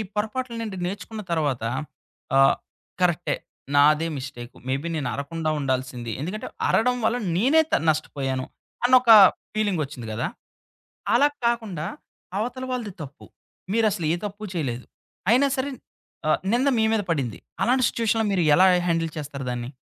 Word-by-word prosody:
పొరపాట్ల 235 +4 -2
నుండి 215 -4 -4
నేర్చుకున్న 210 +3 -5
తర్వాత, 145 -8 0 0.7
ఆహ్, 135 0 +6 0.5
కరెక్టే 175 -1 +2 0.4
నాదే 150 +3 +5
మిస్టేకు. 125 -3 -8
మే 130 - +1
బీ 170 - -5
నేను 140 -5 -2
అరవకుండా 155 +3 -3
ఉండాల్సింది. 130 -3 -2
ఎందుకంటే, 190 +7 -4 0.2
అరవడం 250 +2 +3
వల్ల 235 +2 +2 0.2
నేనే 280 +10 +5
త - - +4
నష్టపోయాను. 135 -4 -1 0.4
అన్నొక 255 -1 +5 0.5
ఫీలింగ్ 205 -6 +1
వచ్చింది 125 -5 -9
కదా! - - -1 0.9
అలా 265 +5 +6 0.2
కాకుండా. 220 -10 -1 0.5
అవతల 250 +4 -3
వాళ్ళది 230 -6 -3
తప్పు. 140 -2 -10 0.5
మీరసలు 215 -6 +1
ఏ - - +2
తప్పు 205 +1 -7
చేయలేదు. 125 -8 -3 0.4
అయినా 255 +5 +5
సరే, 270 +2 -1 0.6
ఆహ్, 155 - +3
నింద 255 +4 +2
మీ 220 - +3
మీద 220 - +2
పడింది. 130 -8 -2 0.2
అలాంటి 255 +1 +3
సిట్యుయేషన్‌లో 225 -1 0
మీరు 185 -3 +2
ఎలా 185 +3 +6 0.2
హ్యాండిల్ 165 -1 0
చేస్తారు 140 -3 -5
దాన్ని? 120 0 -4
175 Hz, 140 wpm, -24 LUFS, 140-225 Hz, 0.9 s, ఆహ్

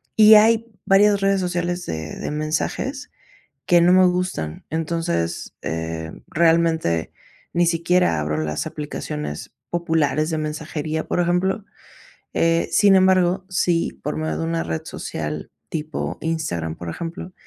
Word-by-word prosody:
y 215 0 +9
hay 225 +2 +5 0.2
varias 200 +1 +4
redes 195 0 +2
sociales 175 0 -2
de 80 -1 -5
de - - -4
mensajes 160 - -2 0.6
que 175 -2 +5
no 175 +1 +5
me 185 0 +6
gustan, 180 - -2
entonces, 155 - -2
eh, 80 0 -4 0.2
realmente 160 - +2 0.4
ni 175 0 +2
siquiera 170 - +2
abro 75 0 -1
las 75 - -2
aplicaciones 150 - -5 0.2
populares 160 -3 +1
de 160 - -1
mensajería, 155 0 -3
por 175 - 0
ejemplo, 185 +4 +1 0.7
eh, 165 0 +2
sin 200 -2 +6
embargo, 185 0 +3
si 175 -2 +1
por - - -3
medio 80 0 -2
de 80 - -2
una 80 0 -1
red 80 -1 -3
social 75 -1 -5 0.2
tipo 155 0 -4
Instagram, 85 - -2
por 85 - -7
ejemplo, 170 - -6
165 Hz, 135 wpm, -22 LUFS, -, 0.7 s, y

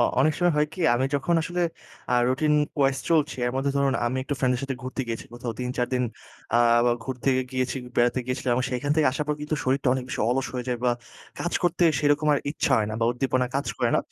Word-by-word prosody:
অ - - +5 0.2
অনেক 155 +3 +4
সময় 175 -2 +3
হয় 150 - +3
কি 185 - -8
আমি 125 +2 +1
যখন 155 +5 +1
আসলে 175 +1 -2 0.5
আ - - +5
রুটিন 150 +4 +1 0.3
wise 135 0 +2
চলছি 155 -3 +2
এর 125 - -1
মধ্যে 140 +1 0
ধরুন 140 -1 +2
আমি 125 - -1
একটু 145 - -2
ফ্রেন্ড 125 -1 +2
এর - - -5
সাথে 135 -1 -2
ঘুরতে 130 +1 -4
গিয়েছি 115 - -4
কোথাও 120 -1 -5
৩ 125 0 -2
৪ 125 -1 +1
দিন 125 - +1 0.5
আ - - +5 0.5
ঘুরতে 130 0 -1 0.2
গিয়েছি 130 0 -1 0.2
বেড়াতে 120 +2 +3
গিয়েছিলাম 125 -1 0
সেখান 135 +3 -2
থেকে 155 - +4
আসার 150 +2 -2
পর 150 - +1
কিন্তু 150 +1 -2
শরীরটা 135 +1 +1
অনেক 130 -1 -3
বেশি - - -4
অলস 130 +1 0
হয়ে 125 -1 -3
যায় 120 -1 -1
বা 125 - +4 0.5
কাজ 175 - -2
করতে 175 0 +2
সেরকম 145 +1 +2
আর - - +1
ইচ্ছা 150 - 0
হয় 105 - +1
না - - -4
বা - - +3
উদ্দীপনা 130 0 0
কাজ 140 - -2
করে - - +2
না। - - +3
135 Hz, 235 wpm, -25 LUFS, 125-150 Hz, 0.5 s, অ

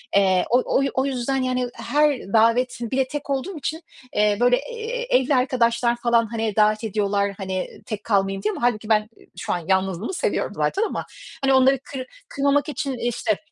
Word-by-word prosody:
Eee, 190 -2 +4
o 245 +2 +4 0.2
oy 275 0 +2
o 260 +1 +1
yüzden, 270 0 -1
yani, 255 -1 -1
her 295 -2 +1
davetin 230 +1 +2
Bir 265 - -1
de 265 -1 +2
tek 290 +1 -6
olduğum 280 +7 -2
için, 315 +3 -4 0.3
eee, 210 0 +3
böyle, 245 0 +4
eee, - - -5
evli 265 +2 +1
arkadaşlar 240 -2 +2
falan, 235 -1 +2
hani, 225 -2 -2
davet 215 +1 +3
ediyorlar 200 -1 0
hani, 190 -2 -3 0.2
tek 210 -2 -5
kalmayayım 195 -2 0
diye 215 - +1
ama - - -7
hâlbuki 225 -3 0
ben 215 0 +2 0.3
şu - - -2
an 175 - -1
yalnızlığımı 190 - 0
seviyorum - - -1
zaten 400 - 0
ama 450 - -3 0.4
hani 270 0 +3
onları 265 0 +5
kır 270 -3 -6 0.2
kırmamak 280 +1 +1
için 280 -3 -3
İşte, 235 -3 -1
240 Hz, 180 wpm, -23 LUFS, 215-275 Hz, 0.4 s, onları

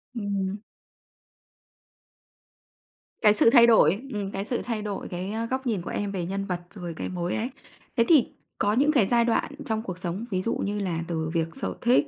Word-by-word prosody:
Ừm. 200 -2 -2 2.6
Cái 210 -1 +6
sự 220 - +5
thay 235 -2 +7
đổi, 200 -3 +5
ừm, 200 -2 -3
cái 195 +1 -3
sự 245 - -2
thay 225 -3 -3
đổi, 205 -2 -4
cái, 185 +3 -4
ơ, 225 +1 -2
góc 260 +2 -3
nhìn 210 -6 0
của - - -6
em 205 -1 -2
về 180 -3 -3
nhân 195 +2 -3
vật, 180 -2 -2
rồi 175 -5 -6
cái - - -3
mối 180 -1 -2
ấy. 235 +4 -2 0.5
Thế 230 - +6
thì 305 -7 +6 0.3
có 205 - +2
những 280 +6 +4
cái 250 -10 +3
giai 235 +1 +3
đoạn 235 +4 +1
trong 220 -1 -1
cuộc 185 -4 -5
sống, 185 +4 -4
ví 185 - 0
dụ 230 - -1
như 205 +1 -2
là 180 -5 -1
từ 160 -2 -2
việc 165 -1 +1
sở 270 - -3
thích 250 +5 +4
205 Hz, 205 wpm, -26 LUFS, 185-230 Hz, 2.6 s, thay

